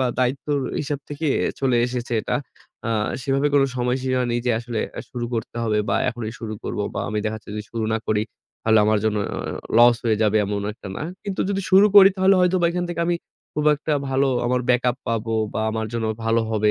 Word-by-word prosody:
বা 130 - +2
দায়িত্বের 140 +3 0 0.2
হিসাব 145 -1 -3
থেকেই 145 -1 -1 0.3
চলে 130 -3 +2
এসেছে 125 -1 -4
এটা। - - -1 0.5
আ - - -1 0.3
সেভাবে 135 +2 +1
কোনো 135 -1 +5
সময়সীমা 125 +1 0
নেই 120 0 0
যে - - +3
আসলে 120 -2 -4 0.3
শুরু 120 -1 -4
করতে 115 +1 -4
হবে 105 -1 +1
বা 100 - +1
এখনই 115 -3 -4
শুরু 110 -2 -5
করব - - -4 0.2
বা - - -2
আমি 105 0 -1
দেখা 110 0 -1
যাচ্ছে 105 - -15
যদি 105 - -4
শুরু 115 -1 -2
না 110 - +1
করি 105 -1 +1 0.4
তাহলে 110 -1 +4
আমার 110 -1 +3
জন্য 110 -1 +1 0.6
loss 120 0 +7
হয়ে 110 -2 +2
যাবে 110 0 +3
এমন 100 0 -2
একটা 105 - -10
না। - - -4 0.2
কিন্তু 200 -2 -3
যদি 195 0 0
শুরু 195 +2 +7
করি 195 -1 +11
তাহলে 190 +1 +4
হয়তোবা 180 -1 +3
এখান 175 0 -2
থেকে 170 -1 -3
আমি 175 0 +1 0.4
খুব 150 0 -1
একটা 150 +1 -3 0.2
ভালো 135 +1 +2 0.2
আমার 125 0 +1
backup 125 0 +2
পাব 115 -2 -1 0.3
বা 110 - -1
আমার 110 0 -2
জন্য 115 -1 -1 0.2
ভালো 115 +1 +2
হবে, 105 -1 +2
125 Hz, 210 wpm, -23 LUFS, 110-145 Hz, 0.6 s, করি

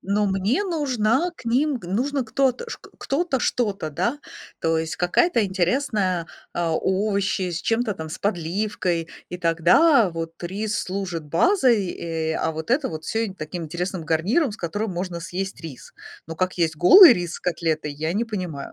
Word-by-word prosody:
но 205 +2 0
мне 200 - 0
нужна 290 - +1
к - - -14
ним, 265 +4 +1
г 200 - -10
нужно 260 +6 -1
кто-то 260 - 0
шк - - -9
кто-то 275 -1 -1
что-то, 205 -11 -1
да, 235 - -1 0.4
то 165 0 +2
есть 160 0 -3
какая-то 230 - +2
интересная, 190 -2 0 0.3
а 170 -1 0
овощи 195 0 0
с 170 -1 -3
чем-то 225 -1 0
там 160 -2 -7
с 155 - -7
подливкой, 180 -2 -1 0.2
и 180 - -5
тогда 180 - +4
вот 165 0 -6
рис 205 +4 -2
служит 185 -4 -4
базой, 240 - +3
э, 160 -1 -3
а 160 - 0
вот 160 +7 -6
это 270 +2 +2
вот 155 -1 -7
всё 225 +1 -1
им 190 - -8
таким 165 +1 -6
интересным 175 +2 -4
гарниром, 205 - +1
с - - -8
которым 205 +5 -3
можно 175 -1 -4
съесть 190 +3 -5
рис. 160 -6 -10 0.3
Но 165 - -6
как 185 +2 -1
есть 160 -3 0
голый 320 - +9
рис 175 -3 -3
с - - -7
котлетой, 160 -4 -1
я 155 +4 -3
не 230 +4 +1
понимаю. 180 -10 -5
190 Hz, 175 wpm, -23 LUFS, 165-230 Hz, 0.4 s, голый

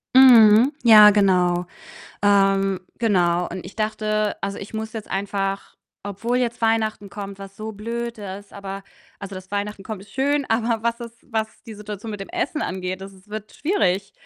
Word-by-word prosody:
Mhm, 240 -1 +8
ja, 215 -3 +9
genau. 180 -3 +2 0.6
Ähm, 195 -2 +3 0.2
genau 180 -6 +2
und 185 0 -7
ich - - -11
dachte 215 -1 -1
also, 195 0 -4
ich 200 - -9
muss 220 0 -4
jetzt 220 -2 -7
einfach, 195 0 -3 0.3
obwohl 220 +5 -2
jetzt 240 -1 -2
Weihnachten 220 -3 0
kommt, 200 -1 -7
was 195 0 -11
so 215 +1 -5
blöd 230 +2 -5
ist, 200 0 -8
aber 195 0 -7 0.4
also, 200 -1 -7
dass 185 0 -11
Weihnachten 205 0 -3
kommt, 210 -2 -6
ist 200 - -18
schön, 280 +1 +1
aber 225 0 0
was 235 0 0
es 235 -2 -8
was 220 -2 -4
die 225 - -10
Situation 210 +1 -7
mit 205 -2 -6
dem 195 - -7
Essen 350 -3 -2
angeht, 185 0 -3
das 195 0 -9
es 190 +1 -20
wird 215 0 -7
schwierig. 200 - 0
210 Hz, 175 wpm, -22 LUFS, 195-225 Hz, 0.6 s, ja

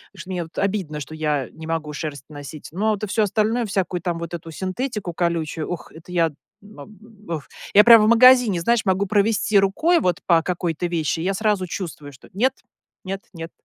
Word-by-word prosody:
Что 185 0 -10
мне 180 -2 -2
вот 160 - -15
обидно, 190 -7 -1
что 150 +2 -8
я 150 -4 -1
не 160 0 -10
могу 160 -2 -3
шерсть 145 -2 -6
носить, 145 0 -9
но 210 +6 0
вот, 210 -1 -3
а - - -1
всё 215 +2 +1
остальное, 220 +4 +1
всякую 190 -3 -2
там 175 -1 -2
вот 170 0 -6
эту 165 -1 -7
синтетику 190 - -4
колючую, 165 -2 -2
ух, 175 - -6
это 165 +2 -13
я 165 -2 +2 0.3
мам 210 0 -13 0.3
ух 160 -4 -5 0.3
я 210 - +8
прямо 230 -2 +8
в - - +3
магазине, 240 -4 +6
знаешь, 235 +5 +2
могу 190 +1 +1
провести 205 +1 +2
рукой 310 - +2
вот 180 - 0
по 170 -2 +4
какой-то 175 -1 -2
вещи, 165 -3 -1
и - - -3
я 195 +2 0
сразу 205 -2 0
чувствую, 160 -5 -6
что: 130 - -17
нет, 250 +8 +2 0.5
нет, 195 +1 -4
нет. 165 -1 -8
180 Hz, 200 wpm, -22 LUFS, 165-210 Hz, 0.5 s, я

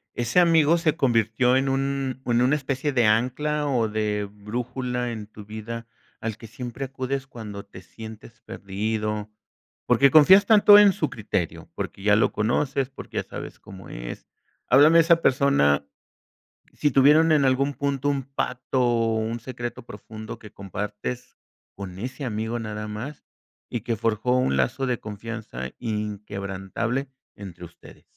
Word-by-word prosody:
Ese 120 +7 +2
amigo 165 -2 +5
se 165 -3 +1
convirtió 120 0 +2
en 135 +1 +2
un 135 -1 -1
en 120 0 +2
una 130 +4 +3
especie 140 0 -2
de 125 -4 +2
ancla 130 +7 +1
o 120 -5 +1
de 105 -1 -1
brújula 125 +4 -4
en 110 -3 -7
tu 105 -1 -12
vida, 110 +2 -7 0.3
al 115 -1 -4
que 115 - -11
siempre 125 +4 -6
acudes 135 0 -4
cuando 105 -5 -8
te 95 -2 -13
sientes 110 +4 -12
perdido, 105 +1 -3 0.6
porque 140 0 +5
confías 185 +6 +8
tanto 205 -1 +8
en 205 -2 +7
su 155 - -1
criterio, 100 -6 -4
porque 100 - -6
ya 105 0 +5
lo 110 - +3
conoces, 125 +5 0
porque 135 - -9
ya - - 0
sabes - - -9
cómo 95 -2 -12
es. - - -8 0.4
Háblame 145 +6 +6
de - - +8
esa 165 0 +4
persona. 125 - +3 0.9
Sí 150 - +2
tuvieron 150 +4 +5
en 150 -3 +4
algún 135 +2 +2
punto 140 0 -1
un 140 -1 -1
pacto 130 -1 -2
o 115 -2 +2
un 110 +2 -2
secreto 120 +1 -6
profundo, 110 0 -9
que 105 -2 -13
compartes 105 +5 -6 0.4
con 95 -2 -8
ese 130 +5 -5
amigo 110 0 -2
nada 105 -2 -5
más, 115 +8 -7 0.4
y 120 - -3
que 115 +2 -2
forjó 115 +3 0
un 125 - +1
lazo 65 - 0
de 125 -2 -1
confianza 105 - -7
inquebrantable 105 +3 -4 0.3
entre 90 -3 -9
ustedes. 85 - -16
120 Hz, 155 wpm, -24 LUFS, 105-135 Hz, 0.9 s, confías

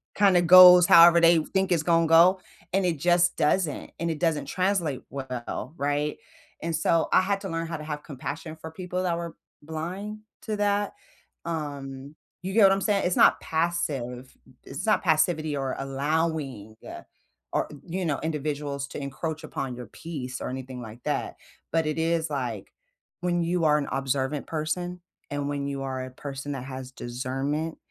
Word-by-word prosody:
kinda 195 -4 +5
goes 180 0 +9
however 170 0 +8
they 170 0 +6
f 155 - -5
think 190 0 +1
it's 165 -3 +2
gonna 165 0 +3
go, 170 +4 +6 0.3
and 195 0 +2
it 170 -3 0
just 175 +2 +3
doesn't, 155 0 0
and 170 0 -1
it 155 - -5
doesn't 165 -4 0
translate 180 -7 -1
well, 130 +1 -5
right? 145 +1 -1 0.5
And 165 0 -1
so, 165 +1 +2
I - - +6
had 195 +1 -1
to 195 - -5
learn 165 0 -2
how 165 0 -4
to 155 - -8
have 150 -1 -5
compassion 145 +3 -6
for 160 0 -8
people 180 +2 -4
that 175 -2 0
were 170 -1 -6 0.3
blind 180 +7 -5 0.2
to 215 - -2
that, 205 0 0 0.5
um, 140 -3 -5 0.3
you 190 +1 -4
get 220 0 +5
what 195 - +7
I'm 195 0 +1
saying? 200 -1 +1
It's 180 - +1
not - - +5
passive 140 -7 -2 0.3
it's 135 +8 -6
not 215 - +3
passivity 155 -2 +2
or 135 -1 -2
allowing, 135 -5 -2 0.8
or - - 0 0.2
you 180 +2 -3
know, 150 -4 -1
individuals 145 -3 -3
to - - -6
encroach 150 +3 -5
upon 130 -2 -4
your 125 0 -8
peace, 135 -7 -7
or - - -3
anything 130 -1 -6
like 115 +1 -10
that, - - -2 0.3
but 165 0 +1
it 155 - -2
is, 165 0 0
like, 125 -8 -4 0.5
when 175 -1 0
you 170 0 0
are 150 -1 +5
an 140 - -3
observant 135 +1 -1
person, 175 +3 -3 0.3
and 145 0 -2
when 140 -1 -2
you 140 -1 -4
are 130 -1 -3
a 130 - -10
person 135 +2 -6
that 135 -3 -5
has 130 -1 -7
discernment, 135 +6 -3
155 Hz, 175 wpm, -26 LUFS, 135-175 Hz, 0.8 s, goes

